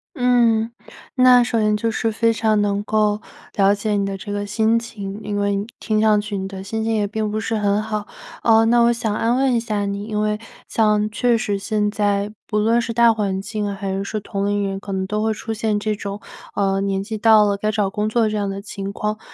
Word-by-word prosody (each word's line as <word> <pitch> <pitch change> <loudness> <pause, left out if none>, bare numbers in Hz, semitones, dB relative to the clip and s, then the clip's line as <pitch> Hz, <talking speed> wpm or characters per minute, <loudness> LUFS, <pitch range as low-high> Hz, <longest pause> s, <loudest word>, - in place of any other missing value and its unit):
嗯， 235 -2 +3 0.4
那 255 -1 +6
首 235 -2 0
先 210 0 +2
就 225 +2 -1
是 225 0 -1
非 230 +1 +2
常 220 -1 +1
能 205 0 0
够 210 0 +1 0.3
了 200 0 +4
解 210 +1 -3
你 200 -1 +1
的 195 0 -3
这 205 +2 -7
个 205 0 -2
心 220 +2 +2
情， 205 -3 -7
因 205 0 -3
为 200 0 +1
你 200 +2 -3
听 215 -1 0
上 215 -1 +4
去 205 0 -4
你 190 - -3
的 190 -1 -7
心 220 +3 -3
情 225 0 0
也 210 -1 +1
并 215 +1 -2
不 215 +1 -2
是 225 +1 -2
很 205 0 +1
好。 215 -1 -4 0.4
呃， 225 -1 +5
那 235 +1 +4
我 235 - +5
想 230 -3 -2
要 235 +2 +2
问 265 -1 +2
一 - - +3
下 215 -3 -2
你， 200 +1 -3
因 215 -1 -2
为 210 0 0 0.3
像 210 -1 +2
确 240 +1 +2
实 205 -4 -2
现 210 0 0
在， 205 -1 0 0.2
不 210 - -1
论 230 +3 +3
是 230 - -3
大 235 0 +5
环 200 -3 -1
境， 205 +1 -3
还 195 -1 -4
是 195 - -2
说 215 +2 -3
同 200 0 -3
龄 205 -1 0
人， 195 0 -4
可 200 - -8
能 190 -1 -1
都 210 +2 -2
会 220 0 +1
出 225 +1 -4
现 215 -1 -1
这 215 0 -1
种， 200 0 -6 0.4
呃， 195 -1 +1
年 195 -1 -1
纪 215 +2 -5
到 215 -1 +6
了， 200 -1 +1
该 215 +2 -1
找 205 -3 0
工 210 +2 -1
作 225 -1 +2
这 215 - -2
样 205 -1 -1
的 195 0 -5
情 200 -1 -6
况。 210 +1 -3
210 Hz, 260 characters per minute, -21 LUFS, 200-225 Hz, 0.4 s, 那